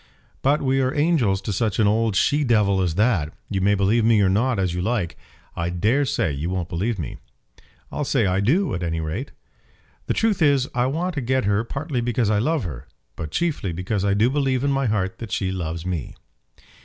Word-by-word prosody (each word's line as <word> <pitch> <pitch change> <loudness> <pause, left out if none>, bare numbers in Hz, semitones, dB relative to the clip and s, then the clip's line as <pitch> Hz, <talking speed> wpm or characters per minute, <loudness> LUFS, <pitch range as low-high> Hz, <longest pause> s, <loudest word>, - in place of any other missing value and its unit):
"But 145 +3 +2
we 135 0 +2
are 130 0 +1
angels 145 - +2
to 105 - -2
such 105 0 0
an 110 - +3
old 110 0 +2
she 145 +9 +2
devil 105 -6 +2
as 85 -3 0
that. 100 -8 +2 0.2
You 95 -2 0
may 100 +2 +3
believe 100 +4 +2
me 110 -1 +4
or 95 - +3
not, 115 +5 +1
as 95 -3 0
you 90 - -2
like. 100 -4 -1 0.4
I 85 +1 -2
dare 110 +11 +1
say 80 - 0
you 75 +5 -3
won't 90 -2 -3
believe 100 +6 -1
me." 80 -9 -5 0.7
"I'll 150 - -2
say 130 -5 +1
I 95 0 +1
do, 155 - +2
at 90 - -3
any 80 -1 -2
rate." 80 - -4 0.8
"The - - 0
truth 220 -5 +1
is, 140 -4 +3
I 125 0 +1
want 170 +7 -2
to 145 - -2
get 130 0 0
her, 100 +2 +2
partly 140 +1 -3
because 120 -2 0
I 105 - +2
love 150 +4 0
her; 70 -6 -7 0.3
but 75 - -5
chiefly 145 - -1
because 90 +4 -2
I 100 -1 +2
do 110 +5 +3
believe 135 -3 0
in 140 - +1
my 135 -1 +1
heart 95 -3 -1
that 115 -4 -7
she 95 -1 -1
loves 85 -2 -4
me." 90 -6 -4
105 Hz, 215 wpm, -23 LUFS, 95-130 Hz, 0.8 s, me